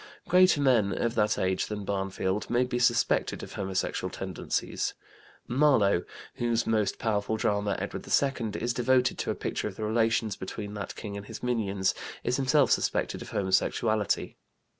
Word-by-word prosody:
Greater 180 -3 +5
men 120 -8 +3
of 120 -1 0
that 105 -2 +2
age 95 0 0
than 105 -1 -5
Barnfield 95 0 -2
may 120 +1 +3
be 125 -1 -2
suspected 125 - +2
of - - -9
homosexual 95 -1 -2
tendencies. - - -3 0.5
Marlowe, 120 -9 +3 0.3
whose 120 -1 +1
most 110 -3 +1
powerful 110 -1 0
drama, 105 -2 0
Edward - - -5
II, 125 -6 +1
is 120 +1 -1
devoted 125 +1 +2
to - - -2
a - - 0
picture - - -3
of 100 - -7
the 110 - -5
relations 110 -1 +1
between 105 +2 -6
that 105 -1 -5
king 105 -2 -6
and 100 0 -8
his - - -8
minions, 100 -6 0 0.3
is 125 - 0
himself 140 +1 +3
suspected - - 0
of - - -8
homosexuality. 100 +2 0
110 Hz, 160 wpm, -28 LUFS, 100-125 Hz, 0.5 s, Greater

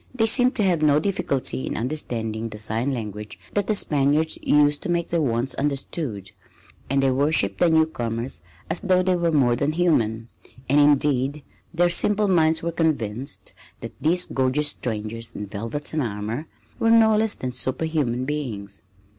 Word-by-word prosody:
They 225 -3 +2
seemed 250 +3 +4
to 220 - 0
have 175 -5 +2
no 150 -1 +4
difficulty 140 -8 -2
in - - -3
understanding 115 -4 -3
the 105 - -9
sign 110 +5 0
language 105 -4 -6 0.2
that 205 -1 0
the 215 - +1
Spaniards 150 -1 +1
used 145 0 +3
to - - -5
make 170 -1 0
their 170 -1 0
wants 120 -1 0
understood, 135 - -3 0.6
and 135 +1 +2
they 135 - +3
worshipped 130 -8 +2
the 175 - +4
newcomers 125 -7 0 0.3
as 165 - 0
though 185 -1 +2
they 185 0 +2
were 170 -1 0
more 130 -6 +3
than 145 +5 -1
human, 115 -10 +1 0.4
and 140 +3 +3
indeed 145 -1 +2 0.3
their 175 +1 +2
simple 210 +4 +2
minds 160 -3 +2
were 170 - -1
convinced 140 -6 -2 0.3
that - - -7
these 175 +3 +2
gorgeous 135 +3 0
strangers 115 -2 -5
in 105 - -5
velvet 110 +10 -4
and 155 - 0
armor 110 +5 -4 0.3
were 225 - +2
no 225 -1 +5
less 220 0 +2
than 130 - -4
superhuman 130 -1 -1
beings. 110 - -5
145 Hz, 165 wpm, -23 LUFS, 115-165 Hz, 0.6 s, no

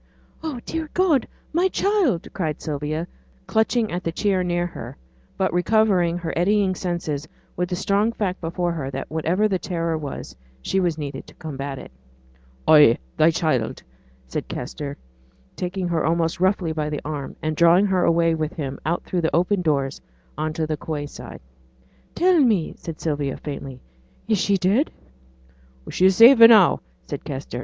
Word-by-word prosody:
'Oh! 310 -6 -4
dear 320 -1 -4
God! 345 -8 +3 0.3
my 350 +4 +3
child!' 380 - +1
cried 160 -6 -2
Sylvia, 150 +2 -3 0.4
clutching 220 0 +1
at 175 +1 -3
the 165 - -1
chair 190 +1 0
near 175 -1 0
her; 175 - -8 0.4
but 190 -4 0
recovering 180 -2 +2
her 170 -2 -4
eddying 195 +2 +2
senses 170 -5 -3 0.3
with 180 0 -2
the 180 - -1
strong 200 +4 +1
fact 200 -5 -3
before 175 +1 -1
her 150 -5 -4
that 135 +1 -6
whatever 170 +6 +1
the 190 -3 -1
terror 165 -3 -2
was, 145 -3 -7 0.2
she 190 - -1
was 175 -4 0
needed 140 -3 -6
to - - -15
combat 140 -3 -6
it. - - -10 0.8
'Ay; 150 -6 +7 0.2
thy 155 +1 +5
child!' 155 -8 -1 0.4
said 65 - -5
Kester, 145 -1 -6 0.6
taking 180 0 -3
her 170 -2 0
almost 165 +1 0
roughly 185 -2 +1
by 155 -1 -2
the 150 -1 -4
arm, 145 -2 -5
and 155 0 -2
drawing 170 +5 +5
her 190 -3 +1
away 165 0 +3
with 155 -1 -2
him 140 -3 -5
out 165 +4 -1
through 180 - -2
the 160 - 0
open 180 +3 +2
doors 140 -5 -1 0.3
on 155 +2 -2
to 160 0 -1
the 155 0 -2
quay 150 -1 -4
side. - - -10 0.7
'Tell 360 -1 +4
me!' 220 - +2
said 165 -2 -8
Sylvia, 145 -4 -2
faintly, 135 -3 -7 0.5
'is 215 -3 +2
she 200 0 +2
dead?' 195 - +2 1.0
'She's 185 +1 +4
safe 235 +4 +8
now,' 225 -5 +8 0.3
said - - -6
Kester. 135 -3 -5
170 Hz, 165 wpm, -23 LUFS, 155-195 Hz, 1.0 s, safe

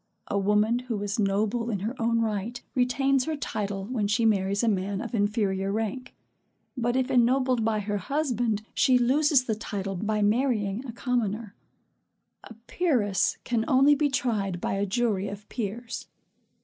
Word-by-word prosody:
A 200 - +1
woman 210 +4 +2
who 245 -4 -4
is 205 +1 -2
noble 215 +4 0
in 200 -5 -2
her 225 +6 -3
own 230 0 +2
right, 220 +2 -2
retains 265 +1 +2
her 315 - -2
title 205 -8 -3
when 220 -2 -1
she 225 +3 +1
marries 200 -1 +2
a - - +2
man 195 -1 0
of 235 0 -6
inferior 205 -3 0
rank; 225 +5 -3 0.6
but 240 -1 0
if 260 +1 0
ennobled 255 -1 +3
by 215 -1 +1
her 205 0 -2
husband, 245 -4 -1
she 255 -2 +4
loses 275 +3 +3
the 230 - -1
title 200 -3 -4
by 210 +3 -1
marrying 215 -1 +1
a - - -4
commoner. 230 -3 -2 0.9
A 230 - -12
peeress 235 - +1
can 235 -3 0
only 270 +3 +5
be 290 0 +2
tried 210 -9 -1
by - - -2
a 200 +1 -1
jury 210 -2 0
of 205 +1 -8
peers. 230 +1 -5
225 Hz, 160 wpm, -27 LUFS, 205-250 Hz, 0.9 s, only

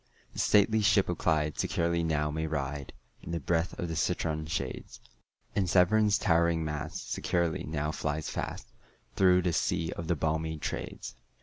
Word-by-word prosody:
The - - -7
stately 110 +2 +4
ship 105 - +3
of - - -2
Clyde 75 -1 +1
securely 85 0 +1
now 75 -2 0
may 80 +1 -2
ride, 70 -2 -3 0.3
In - - -10
the 85 - -1
breath 85 +4 -1
of 85 - -3
the 80 - -4
citron 80 0 -1
shades; 70 -5 -4 0.6
And 95 -3 +1
Severn's 100 +3 +4
towering 85 -2 +2
mast 75 +1 -5
securely 85 -2 0
now 75 0 -2
flies 75 0 -3
fast, - - -4 0.5
Through 90 -1 +5
the 90 -1 +1
sea 80 +1 0
of 85 - -6
the 85 - +2
balmy 80 +1 -1
Trades. 75 - -5
80 Hz, 165 wpm, -30 LUFS, 75-85 Hz, 0.6 s, Through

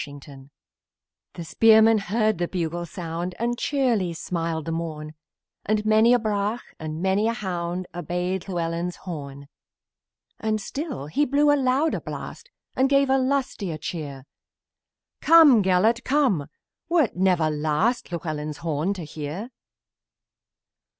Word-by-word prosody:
BETH 145 -1 -10
GELERT 135 -1 -14 0.9
The 170 - -6
spearman 220 +5 +5
heard 215 0 0
the 175 - 0
bugle 175 -1 -3
sound, 170 +2 -5
And 240 +1 -1
cheerily 240 - 0
smiled 165 -1 -3
the 165 - -3
morn; 155 -2 -5 0.5
And 215 0 0
many 220 +2 +5
a - - +5
brach, 215 0 -2 0.2
and 155 +2 -5
many 195 +3 +2
a 230 - +1
hound, 180 -4 -3
Attend 180 +2 -3
Llewellyn's 170 -1 -2
horn: 140 -5 -8 0.9
And 215 -1 -1
still 275 - -5
he 155 - 0
blew 290 +2 +3
a - - +4
louder 275 +3 +1
blast, - - -8 0.3
And 265 +1 +2
gave 275 -1 +3
a 270 - +4
louder 255 - -1
cheer: 145 -4 -6 1.0
"Come, 310 -8 +7
Gelert! 195 +5 +3
Why 285 - 0
art 250 - +1
thou 185 0 +3
the 160 -2 0
last 155 +11 0
Llewellyn's 155 -3 -4
horn 160 +5 -1
to 180 - -6
hear? 155 - -6
185 Hz, 135 wpm, -24 LUFS, 160-230 Hz, 1.0 s, Come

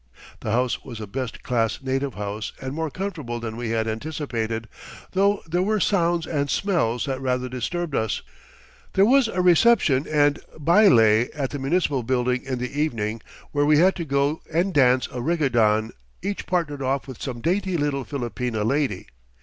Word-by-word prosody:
The - - -5
house 125 +2 0
was 120 -4 -8
a 110 - -5
best 125 +3 -5
class 115 -3 0
native 135 0 -2
house 105 +1 -4
and 130 0 -5
more 160 +1 -2
comfortable 155 -9 -4
than 115 -1 -5
we 120 -1 -4
had 115 0 0
anticipated, 115 -3 -3 0.4
though 200 +2 +2
there 175 +2 0
were 215 +3 +1
sounds 175 -4 +1
and 145 -3 -1
smells 155 - 0
that 135 -2 -3
rather 125 -1 -1
disturbed 145 +6 -3
us. 110 -4 -1 0.7
There 195 - +5
was 260 +2 +5
a 185 -4 -1
reception 175 - +4
and 145 -1 +2 0.2
baile 125 - +5
at 140 -3 -2
the 145 - -4
municipal 140 -1 +1
building 125 +1 0
in 135 -2 -3
the 125 +4 -3
evening, 115 -7 -2 0.3
where 145 0 +1
we 150 0 +5
had 185 +5 +5
to 170 - -2
go 140 +1 0
and 175 +4 +1
dance 130 -3 +4
a 125 -2 -4
rigodon, 120 -8 +2 0.3
each 200 +1 -3
partnered 160 -6 -1
off 135 +1 -1
with 130 -3 -9
some 125 -4 -4
dainty 185 +5 0
little 145 -2 -1
Filipina 120 -4 -3
lady. 130 -6 0
135 Hz, 175 wpm, -24 LUFS, 120-165 Hz, 0.7 s, There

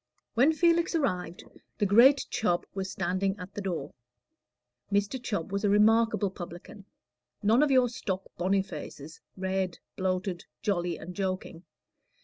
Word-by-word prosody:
When 255 +7 +5
Felix 340 +1 +2
arrived, 180 - -1 0.3
the 205 - +1
great 245 +8 +6
Chubb 175 -5 0
was 195 -1 -3
standing 190 +2 -1
at 180 0 -9
the 205 - -5
door. 170 -7 -4 1.0
Mr. 205 +5 0
Chubb 200 -8 -3
was 200 +1 -2
a 205 - +3
remarkable 215 0 +4
publican; 180 +2 -9 0.6
none 225 +6 +4
of 300 - +4
your 255 -2 +5
stock 190 -5 -3
Bonifaces, 175 -5 -3 0.2
red, 190 -1 -1 0.2
bloated, 185 -1 -2 0.2
jolly, 175 -4 0
and 180 +3 -8
joking. 185 -3 -3
195 Hz, 130 wpm, -29 LUFS, 180-225 Hz, 1.0 s, great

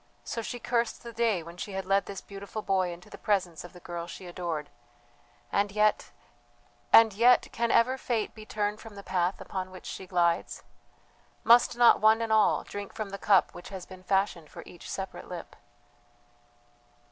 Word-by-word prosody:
So 230 - -4
she 245 - -5
cursed 235 -1 -1
the 235 -1 -8
day 220 -6 +1
when 170 +2 -11
she 200 +2 -6
had 190 0 -3
led 195 +1 +2
this 195 -1 -6
beautiful 200 +2 -8
boy 190 -2 +1
into 175 +1 -11
the - - -12
presence 185 -6 0
of 175 - -11
the 180 - -13
girl 170 -1 -6
she 180 - -9
adored. 170 -4 -4 0.8
And 200 0 +1
yet 210 +1 +2 0.8
and 225 -2 +8
yet 240 +5 +4
can 235 0 -1
ever 250 +3 +3
Fate 230 -5 -2
be 215 - -11
turned 210 0 -2
from 225 -2 -11
the 200 - -9
path 180 0 0
upon 185 -1 -5
which 185 -1 -12
she 190 - -7
glides? 170 -2 0 0.8
Must 235 0 +5
not 240 -1 +6
one 220 +1 +6
and 225 -1 0
all 215 -1 +4
drink 205 -1 -8
from 215 -2 -4
the 200 - -6
cup 195 -3 +3
which 175 - -10
has 190 -2 -7
been 185 -1 -12
fashioned 190 -4 0
for - - -10
each - - -12
separate - - -6
lip? - - -8
200 Hz, 185 wpm, -28 LUFS, 180-220 Hz, 0.8 s, and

